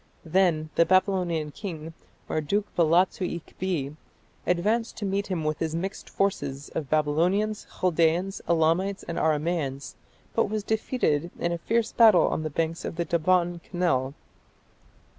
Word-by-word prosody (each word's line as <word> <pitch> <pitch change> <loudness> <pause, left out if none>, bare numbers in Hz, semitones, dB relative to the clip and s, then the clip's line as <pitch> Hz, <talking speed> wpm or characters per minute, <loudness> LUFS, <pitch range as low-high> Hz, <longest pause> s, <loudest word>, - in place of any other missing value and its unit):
Then 160 -3 +2
the - - +5
Babylonian 180 -4 +1
king, 165 -4 -7 0.3
Marduk 195 +7 0
balatsu 175 +3 +3 0.2
ikbi, 165 -5 -4 0.5
advanced 215 +7 +1
to 210 - -3
meet 200 +1 -1
him 180 -5 -2
with 155 0 -1
his 160 -1 -2
mixed 190 +4 -4
force 195 0 0 0.3
of 145 -4 -4
Babylonians, 175 +8 +1
Chaldaeans, 175 +2 +2
Elamites, 170 +4 +2
and 170 - -4
Aramaeans, 150 -3 -1 0.4
but 230 - +2
was 215 0 -2
defeated 205 - 0
in 170 - -1
a 170 - -2
fierce 230 +5 0
battle 220 -6 +6
on - - -1
the 155 - -3
banks 165 +2 -2
of - - -4
the 170 0 -1
Daban 170 +1 +1
canal. 145 -8 -1
170 Hz, 140 wpm, -26 LUFS, 155-195 Hz, 0.5 s, battle